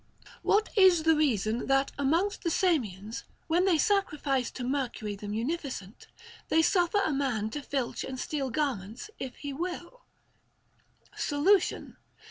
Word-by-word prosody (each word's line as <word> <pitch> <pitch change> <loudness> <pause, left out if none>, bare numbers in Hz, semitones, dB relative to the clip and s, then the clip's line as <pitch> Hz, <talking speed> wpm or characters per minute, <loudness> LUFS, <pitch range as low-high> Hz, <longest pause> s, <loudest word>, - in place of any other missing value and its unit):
What 425 +2 +2
is 375 -5 +6
the 320 0 +5
reason 235 -6 +1
that 270 0 +2
amongst 330 +9 +1
the 340 - 0
Samians, 230 - 0 0.2
when 345 +3 +2
they 365 -4 +4
sacrifice 300 - +1
to 255 - -7
Mercury 245 -5 -2
the 205 +1 -8
munificent, 230 - -4 0.4
they 320 0 +4
suffer 360 +3 +3
a 310 - 0
man 245 -6 -1
to 295 - -4
filch 275 -3 -3
and 260 -1 -6
steal 275 -2 -2
garments 245 - -3
if 260 -2 -5
he 285 -1 -6
will 350 - -5 1.1
1 - - -21
Solution. 345 +6 +1
285 Hz, 140 wpm, -29 LUFS, 245-345 Hz, 1.1 s, is